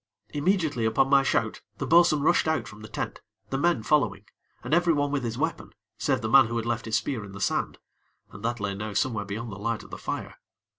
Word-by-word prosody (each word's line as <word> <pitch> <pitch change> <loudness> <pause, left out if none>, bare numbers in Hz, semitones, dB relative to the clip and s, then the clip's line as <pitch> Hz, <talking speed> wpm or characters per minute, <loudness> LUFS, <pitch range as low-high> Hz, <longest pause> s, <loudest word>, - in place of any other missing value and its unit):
Immediately 150 - +1
upon 135 +5 +2
my 140 -1 +7
shout, 115 -4 0 0.2
the 140 - -3
bo'sun 160 -1 +5
rushed 175 +1 +3
out 160 0 0
from 105 0 -11
the 110 - -8
tent, - - -5 0.3
the 135 - 0
men 170 -8 +2
following, 125 -9 +1 0.4
and - - -3
every 170 0 +4
one 145 -1 0
with 140 -3 -1
his 115 -1 -3
weapon, - - -3 0.3
save - - +1
the 110 - -2
man 130 +2 +7
who 115 +1 -3
had 115 - -2
left 120 -1 -2
his 110 -1 -1
spear 115 +1 -1
in 100 -1 -10
the 100 - -8
sand, - - -1 0.5
and 105 - -11
that 120 +1 -1
lay 100 -1 -2
now 105 +1 -5
somewhere 105 0 0
beyond 110 +3 -5
the 95 - -8
light 115 +1 -2
of - - -15
the - - -7
fire. - - -5
115 Hz, 235 wpm, -27 LUFS, 110-145 Hz, 0.5 s, my